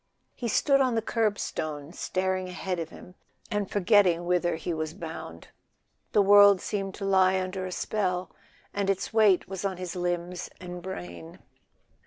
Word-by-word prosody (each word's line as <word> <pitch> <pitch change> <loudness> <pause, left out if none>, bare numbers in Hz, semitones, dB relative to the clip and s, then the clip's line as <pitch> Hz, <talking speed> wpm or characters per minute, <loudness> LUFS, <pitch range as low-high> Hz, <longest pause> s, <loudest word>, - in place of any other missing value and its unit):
He 240 - -4
stood 275 +4 +3
on 255 -3 +2
the 225 - +1
kerbstone, 165 -10 -2
staring 185 0 -2
ahead 180 0 -3
of 165 -1 -4
him 180 - -13 0.4
and 205 -2 -1
forgetting 185 -4 +3
whither 175 -1 +1
he 170 +2 -3
was 155 0 -4
bound. 120 - -8 0.6
The 205 - +5
world 205 -1 +7
seemed 195 -1 -3
to 200 - -5
lie 190 -1 +4
under 185 0 -3
a - - -6
spell, 185 -2 -2 0.4
and 200 -1 -1
its 195 +2 -1
weight 215 -5 +4
was 190 0 -6
on 190 -2 -2
his 180 -1 -5
limbs 175 0 -3
and 180 -1 -7
brain. 85 - -8
185 Hz, 160 wpm, -27 LUFS, 175-200 Hz, 0.6 s, world